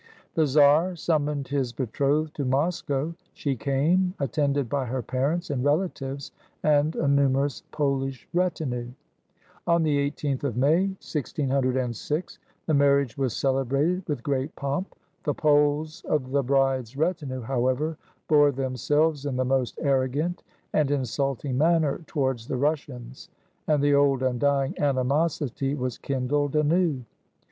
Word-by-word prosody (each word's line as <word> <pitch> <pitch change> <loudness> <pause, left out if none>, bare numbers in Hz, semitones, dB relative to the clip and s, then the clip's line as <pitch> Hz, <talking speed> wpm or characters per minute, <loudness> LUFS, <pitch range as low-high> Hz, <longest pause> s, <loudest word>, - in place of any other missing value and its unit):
The 160 -2 +2
czar 150 +6 +4
summoned 150 -4 -1
his 135 -4 -1
betrothed 140 +5 0
to 145 - -1
Moscow. 140 +2 0 0.2
She 140 -2 -2
came, 160 - +1
attended 140 -1 0
by 135 +2 -1
her 125 +1 -3
parents 145 +8 -1
and 130 -3 -1
relatives 145 -3 -1 0.3
and 150 +1 +3
a - - 0
nu 140 0 +4
merous 135 +1 0
Polish 135 -3 -2
retinue. 155 -9 -1 0.8
On 170 -1 +3
the 145 -2 +2
i8th 145 -2 -3
of 125 -5 -2
May, 160 +9 +3
1606, 135 - -2 0.3
the 160 - 0
marriage 140 -4 +3
was 130 -4 -1
celebrated 135 +6 +1
wuth 145 -5 -2
great 140 +1 -2
pomp. 140 +7 -3 0.3
The 145 - -1
Poles 150 +3 +2
of 130 -4 -1
the 140 0 +2
bride's 135 -2 +1
retinue, 150 -5 -1
however, 130 +6 0 0.3
bore 145 -2 +5
themiselves 140 +3 0
in 135 - -2
the 130 0 0
most 130 -1 0
arrogant 140 +5 0 0.3
and 150 -3 +2
insulting 135 0 -1
manner 160 -2 +2
towards 130 -6 -1
the 130 - -2
Rus 150 +3 +2
sians, 125 +2 -11 0.4
and 150 -3 +2
the 145 0 +4
old, 140 -2 +3
undying 135 +2 +1
animosity 140 0 0
was 125 -3 -3
kindled 140 +2 -1
anew. 155 -2 +2
140 Hz, 135 wpm, -26 LUFS, 130-150 Hz, 0.8 s, bore